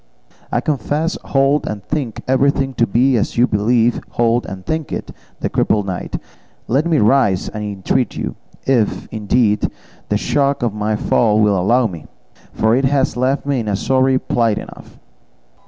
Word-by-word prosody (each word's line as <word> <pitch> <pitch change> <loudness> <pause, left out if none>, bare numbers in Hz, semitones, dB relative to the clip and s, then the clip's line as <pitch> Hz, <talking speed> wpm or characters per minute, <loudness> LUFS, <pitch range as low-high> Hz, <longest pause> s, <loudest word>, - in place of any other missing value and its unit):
"I - - +1
confess, 150 +3 -1
hold, 140 +2 +2
and 105 -2 -5
think 135 -5 -3
everything 135 0 +2
to 115 -1 +1
be 125 +5 +3
as 105 - -2
you 120 - +5
believe, 115 +2 +1
hold, 120 0 +1
and 95 -1 -8
think 160 -2 -3
it," - - -4 0.3
the - - 0
crippled 105 -2 +1
knight; 95 -2 -4 0.5
"let 135 +8 +1
me 165 -2 +2
rise, 105 -5 +2
I 105 - -4
entreat 105 +4 -1
you; - - -4 0.3
if, 120 -6 +1
indeed, 105 0 +1 0.4
the - - +2
shock 140 -2 0
of 115 -4 0
my 105 0 -1
fall 105 0 +2
will 105 -2 +3
allow 115 +7 +2
me, 85 -7 -5 0.4
for 110 +1 +2
it 135 +2 +2
has 135 0 +1
left 130 +3 0
me 140 -2 0
in 110 - -4
a 100 - 0
sorry 130 +4 +2
plight 115 -4 0
enough." - - -10
120 Hz, 170 wpm, -18 LUFS, 105-135 Hz, 0.5 s, you